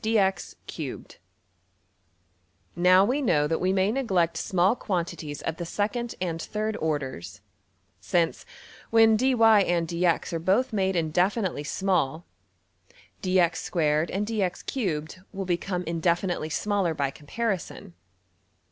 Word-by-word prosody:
\] -, -, -32 dB, 2.7 s
Now 185 Hz, +2 st, +5 dB
we 260 Hz, +7 st, 0 dB
know 160 Hz, -, +2 dB
that 160 Hz, +2 st, -1 dB
we 185 Hz, +1 st, +2 dB
may 190 Hz, +1 st, +2 dB
neglect 190 Hz, -10 st, +1 dB
small 190 Hz, +2 st, +2 dB
quantities 170 Hz, -, -4 dB
of 165 Hz, -, -3 dB
the 175 Hz, -, -4 dB
second 230 Hz, +6 st, -2 dB
and 170 Hz, -3 st, -3 dB
third 215 Hz, +2 st, -3 dB
orders; 130 Hz, -, -4 dB, 0.6 s
since, 170 Hz, -2 st, 0 dB, 0.5 s
when 225 Hz, -1 st, +6 dB
$dy$~and~$dx$ 185 Hz, -9 st, +3 dB
are 165 Hz, -, -1 dB
both 200 Hz, +9 st, +1 dB
made 190 Hz, -2 st, +1 dB
indefinitely 180 Hz, +1 st, 0 dB
small, 170 Hz, -3 st, 0 dB, 1.0 s
$(dx)^2$~and~$(dx)^3$ 180 Hz, -, -1 dB
will 195 Hz, -1 st, -5 dB
become 180 Hz, +1 st, -2 dB
indefinitely 170 Hz, 0 st, -1 dB
smaller 195 Hz, -1 st, 0 dB
by 140 Hz, -2 st, -1 dB
comparison. 190 Hz, +4 st, -4 dB
180 Hz, 100 wpm, -26 LUFS, 165-205 Hz, 2.7 s, when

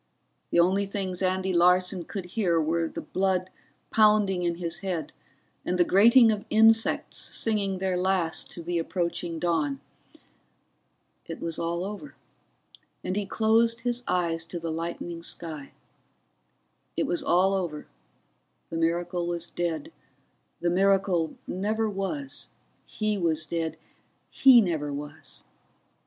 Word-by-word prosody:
The -, -, +2 dB
only 190 Hz, +3 st, +3 dB
things 190 Hz, -2 st, -3 dB
Andy 190 Hz, 0 st, 0 dB
Larson 180 Hz, +1 st, +3 dB
could 195 Hz, -3 st, -6 dB
hear 180 Hz, -7 st, +2 dB
were 165 Hz, +1 st, 0 dB
the -, -, -7 dB
blood 185 Hz, -1 st, -1 dB, 0.4 s
pounding 210 Hz, -4 st, +4 dB
in 170 Hz, -1 st, 0 dB
his 170 Hz, -1 st, -4 dB
head 180 Hz, -6 st, -4 dB, 0.5 s
and 180 Hz, -, -1 dB
the 175 Hz, -, +5 dB
grating 230 Hz, +5 st, +6 dB
of 205 Hz, -1 st, -2 dB
insects 225 Hz, +1 st, +3 dB
singing 200 Hz, -4 st, -1 dB
their 190 Hz, 0 st, -1 dB
last 180 Hz, -2 st, 0 dB
to 170 Hz, -, -8 dB
the 170 Hz, 0 st, -1 dB
approaching 170 Hz, 0 st, -2 dB
dawn. 155 Hz, -5 st, 0 dB, 1.5 s
It 165 Hz, -, -6 dB
was 165 Hz, -1 st, -2 dB
all 170 Hz, +2 st, -2 dB
over, 210 Hz, +9 st, -8 dB, 0.9 s
and 185 Hz, -, -2 dB
he 205 Hz, -1 st, -2 dB
closed 230 Hz, +2 st, +2 dB
his 245 Hz, 0 st, -1 dB
eyes 170 Hz, -2 st, 0 dB
to 170 Hz, +1 st, -6 dB
the 165 Hz, -1 st, -4 dB
lightening 170 Hz, +1 st, -5 dB
sky. 155 Hz, -4 st, -5 dB, 1.3 s
It -, -, +1 dB
was 345 Hz, -, 0 dB
all 190 Hz, -7 st, +3 dB
over, 175 Hz, -6 st, -3 dB, 0.9 s
the 165 Hz, -, -3 dB
miracle 170 Hz, +1 st, 0 dB
was 175 Hz, 0 st, -4 dB
dead, 175 Hz, -, -3 dB, 0.7 s
the 175 Hz, -, +1 dB
miracle 190 Hz, -3 st, +2 dB
never 215 Hz, +4 st, -1 dB
was, 215 Hz, +8 st, -4 dB, 0.4 s
he 215 Hz, -2 st, -2 dB
was 160 Hz, -2 st, 0 dB
dead, 160 Hz, 0 st, -3 dB, 0.5 s
he 255 Hz, -3 st, +7 dB
never 160 Hz, -7 st, -1 dB
was. 145 Hz, +1 st, -6 dB
180 Hz, 130 wpm, -27 LUFS, 170-200 Hz, 1.5 s, he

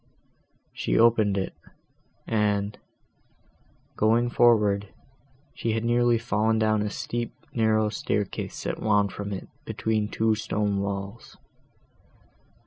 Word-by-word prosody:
She -, -, -1 dB
opened 110 Hz, -3 st, +4 dB
it, 95 Hz, -, -2 dB, 0.7 s
and, 105 Hz, -2 st, 0 dB, 1.2 s
going 115 Hz, +3 st, +2 dB
forward, 105 Hz, -5 st, +3 dB, 0.7 s
had 115 Hz, 0 st, 0 dB
nearly 120 Hz, 0 st, +3 dB
fallen 110 Hz, -1 st, +1 dB
down 110 Hz, -1 st, +2 dB
a 105 Hz, -, -1 dB
steep, 120 Hz, +3 st, -4 dB, 0.2 s
narrow 110 Hz, -2 st, +2 dB
staircase 105 Hz, -1 st, -3 dB
that -, -, -3 dB
wound 105 Hz, -2 st, +2 dB
from 100 Hz, 0 st, -5 dB
it, 95 Hz, -, -5 dB, 0.2 s
between 110 Hz, -1 st, -1 dB
two 110 Hz, 0 st, +1 dB
stone 105 Hz, -2 st, -1 dB
walls. 100 Hz, +2 st, -5 dB
110 Hz, 105 wpm, -26 LUFS, 100-115 Hz, 1.2 s, opened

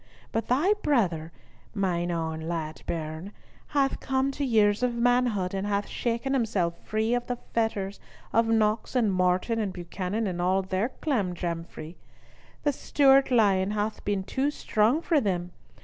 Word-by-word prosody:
But 225 Hz, -1 st, -2 dB
thy 300 Hz, +12 st, +3 dB
brother, 175 Hz, -, +1 dB, 0.4 s
mine 175 Hz, -3 st, 0 dB
ain 160 Hz, -2 st, -3 dB
lad 160 Hz, -2 st, -4 dB
bairn, 160 Hz, +3 st, -4 dB, 0.4 s
hath 275 Hz, -2 st, +1 dB
come 265 Hz, 0 st, 0 dB
to 285 Hz, -, -4 dB
years 215 Hz, -4 st, +3 dB
of 250 Hz, -1 st, +1 dB
manhood, 235 Hz, -6 st, +2 dB
and 195 Hz, +1 st, -2 dB
hath 205 Hz, 0 st, 0 dB
shaken 240 Hz, +3 st, -2 dB
himself 200 Hz, -9 st, 0 dB
free 220 Hz, +2 st, 0 dB
of 245 Hz, 0 st, -1 dB
the 245 Hz, -, -1 dB, 0.2 s
fetters 205 Hz, -4 st, -1 dB, 0.3 s
of 230 Hz, +1 st, +4 dB
Knox 220 Hz, +1 st, +1 dB
and 220 Hz, -6 st, +3 dB
Morton 185 Hz, +5 st, +1 dB
and 205 Hz, -3 st, -1 dB
Buchanan, 185 Hz, +4 st, -3 dB
and 180 Hz, -3 st, -2 dB
all 190 Hz, +2 st, +2 dB
their 190 Hz, +5 st, -1 dB
clamjamfrie. 175 Hz, -, -3 dB, 0.7 s
The 290 Hz, -, +2 dB
Stewart 275 Hz, 0 st, +4 dB
lion 200 Hz, -6 st, +3 dB
hath 210 Hz, +1 st, -2 dB
been 200 Hz, -2 st, -1 dB
too 265 Hz, +8 st, 0 dB
strong 250 Hz, +1 st, +1 dB
for 315 Hz, -5 st, +3 dB
them. 180 Hz, -5 st, -1 dB
210 Hz, 150 wpm, -27 LUFS, 180-245 Hz, 0.7 s, of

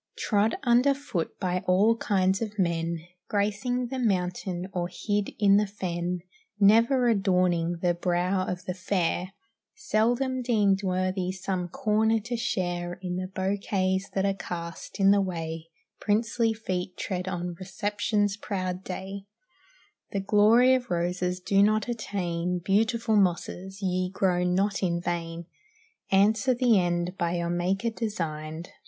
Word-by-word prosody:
Trod 210 Hz, +1 st, +1 dB
under 250 Hz, +3 st, +4 dB
foot 270 Hz, -, -4 dB
by 180 Hz, -2 st, -1 dB
all 200 Hz, +5 st, +4 dB
kinds 190 Hz, -3 st, +1 dB
of 215 Hz, -1 st, -4 dB
men; 170 Hz, -2 st, 0 dB, 0.3 s
Gracing 230 Hz, +4 st, -1 dB
the 265 Hz, 0 st, -3 dB
mountain 180 Hz, -4 st, -1 dB
or 175 Hz, -1 st, -2 dB
hid 205 Hz, 0 st, -1 dB
in 200 Hz, -1 st, +5 dB
the 210 Hz, 0 st, +2 dB
fen; 180 Hz, -3 st, -3 dB, 0.4 s
Never 230 Hz, +5 st, +5 dB
adorning 180 Hz, -5 st, +2 dB
the 175 Hz, -1 st, +3 dB
brow 180 Hz, +2 st, 0 dB
of 180 Hz, 0 st, -4 dB
the 180 Hz, -, -2 dB
fair; 180 Hz, 0 st, -1 dB, 0.4 s
Seldom 245 Hz, +4 st, 0 dB
deemed 205 Hz, -5 st, +2 dB
worthy 185 Hz, -1 st, -1 dB
some 185 Hz, -1 st, -3 dB
corner 220 Hz, +4 st, +1 dB
to 235 Hz, +3 st, -4 dB
share 175 Hz, -7 st, -2 dB
In 180 Hz, -1 st, -3 dB
the 185 Hz, 0 st, -3 dB
bouquets 190 Hz, 0 st, -1 dB
that 195 Hz, 0 st, +1 dB
are 195 Hz, -, +2 dB
cast 175 Hz, 0 st, -7 dB
in 195 Hz, 0 st, +6 dB
the 200 Hz, 0 st, +4 dB
way 165 Hz, -3 st, -4 dB, 0.3 s
Princely 225 Hz, +2 st, +1 dB
feet 185 Hz, -4 st, -4 dB
tread 180 Hz, -1 st, -3 dB
on 175 Hz, -1 st, -3 dB
reception's 205 Hz, +2 st, -1 dB
proud 185 Hz, -3 st, -3 dB
day; 195 Hz, +1 st, -6 dB, 0.9 s
The 200 Hz, -, 0 dB
glory 220 Hz, +6 st, +5 dB
of 250 Hz, -2 st, 0 dB
roses 180 Hz, +1 st, -1 dB
do 195 Hz, +2 st, +2 dB
not 215 Hz, +1 st, +3 dB
attain; 180 Hz, -6 st, -2 dB
Beautiful 220 Hz, +5 st, +1 dB
mosses, 190 Hz, +1 st, -1 dB
ye 185 Hz, -1 st, 0 dB
grow 180 Hz, -2 st, +1 dB
not 195 Hz, +3 st, +1 dB
in 170 Hz, -3 st, 0 dB
vain. 170 Hz, -1 st, -4 dB, 0.6 s
Answer 210 Hz, +5 st, +3 dB
the 240 Hz, -4 st, +4 dB
end 175 Hz, 0 st, -1 dB
by 170 Hz, 0 st, 0 dB
your 170 Hz, 0 st, -1 dB
Maker 190 Hz, +6 st, 0 dB
designed. 165 Hz, -7 st, -4 dB
190 Hz, 140 wpm, -27 LUFS, 180-210 Hz, 0.9 s, in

